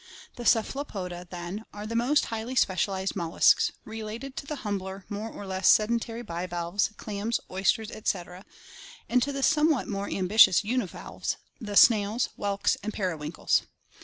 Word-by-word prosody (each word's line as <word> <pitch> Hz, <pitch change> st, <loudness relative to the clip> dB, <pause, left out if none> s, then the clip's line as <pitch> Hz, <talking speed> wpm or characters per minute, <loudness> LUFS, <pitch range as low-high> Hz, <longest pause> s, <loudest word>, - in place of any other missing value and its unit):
The 240 Hz, -, -7 dB
Cephalopoda, 195 Hz, -8 st, -1 dB
then, 175 Hz, +4 st, -6 dB
are 210 Hz, 0 st, -7 dB
the 230 Hz, +2 st, -4 dB
most 255 Hz, +6 st, +3 dB
highly 225 Hz, +3 st, -4 dB
specialized 190 Hz, -3 st, +1 dB
mol 170 Hz, -3 st, -3 dB
luscs, -, -, +5 dB, 0.2 s
related 225 Hz, +5 st, -6 dB
to 280 Hz, -, -5 dB
the 300 Hz, -, -3 dB
humbler, 190 Hz, -1 st, -4 dB
more 210 Hz, +2 st, -4 dB
or 205 Hz, -, -9 dB
less 190 Hz, 0 st, +2 dB
sedentary 230 Hz, +2 st, +2 dB
bivalves, 175 Hz, 0 st, -2 dB
clams, 215 Hz, +2 st, -2 dB
oysters, 195 Hz, +4 st, +1 dB
etc., 180 Hz, -3 st, -3 dB, 0.6 s
and 250 Hz, +1 st, +3 dB
to 280 Hz, +3 st, 0 dB
the 275 Hz, -1 st, -3 dB
somewhat 305 Hz, -2 st, +3 dB
more 200 Hz, -1 st, -3 dB
ambitious 190 Hz, 0 st, +5 dB
univalves, 245 Hz, +4 st, -3 dB, 0.2 s
the 205 Hz, -4 st, -5 dB
snails, 225 Hz, -3 st, +5 dB
whelks, 200 Hz, -1 st, 0 dB
and 210 Hz, +2 st, -4 dB
periwinkles. 165 Hz, -5 st, 0 dB
210 Hz, 145 wpm, -27 LUFS, 190-235 Hz, 0.6 s, luscs